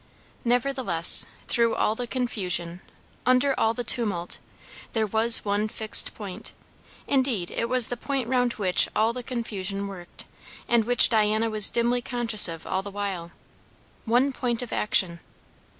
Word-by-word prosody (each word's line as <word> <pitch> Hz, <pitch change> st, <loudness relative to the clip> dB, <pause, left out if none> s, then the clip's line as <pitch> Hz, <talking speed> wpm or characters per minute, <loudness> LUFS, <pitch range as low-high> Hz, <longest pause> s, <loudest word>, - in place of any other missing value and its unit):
Nevertheless, 245 Hz, -8 st, +1 dB, 0.2 s
through 230 Hz, -1 st, +1 dB
all 215 Hz, -, 0 dB
the 245 Hz, +2 st, -6 dB
confusion, 185 Hz, -8 st, -3 dB, 0.4 s
under 255 Hz, +2 st, +2 dB
all 225 Hz, +1 st, 0 dB
the 245 Hz, -, -4 dB
tumult, 205 Hz, -8 st, -1 dB, 0.5 s
there 220 Hz, -1 st, 0 dB
was 220 Hz, +2 st, +4 dB
one 205 Hz, +1 st, -1 dB
fixed 215 Hz, 0 st, +3 dB
point; 205 Hz, 0 st, -9 dB, 0.5 s
indeed, 255 Hz, -10 st, -1 dB
it 230 Hz, -, -4 dB
was 250 Hz, -2 st, +4 dB
the 245 Hz, -, -4 dB
point 270 Hz, -1 st, -4 dB
round 245 Hz, -1 st, 0 dB
which 190 Hz, -3 st, +3 dB
all 220 Hz, +2 st, +1 dB
the 250 Hz, -, -6 dB
confusion 205 Hz, -5 st, -5 dB
worked, 180 Hz, -3 st, -10 dB, 0.4 s
and 235 Hz, -2 st, +1 dB
which 245 Hz, +1 st, +6 dB
Diana 220 Hz, 0 st, 0 dB
was 215 Hz, -2 st, +2 dB
dimly 240 Hz, +1 st, 0 dB
conscious 235 Hz, -5 st, +4 dB
of 165 Hz, -1 st, -9 dB
all 190 Hz, -, -3 dB
the 200 Hz, -, -9 dB
while; 195 Hz, -4 st, -6 dB, 0.8 s
one 250 Hz, +4 st, +1 dB
point 245 Hz, -2 st, -1 dB
of 245 Hz, -, -8 dB
action. 180 Hz, -5 st, +1 dB
225 Hz, 150 wpm, -24 LUFS, 200-245 Hz, 0.8 s, which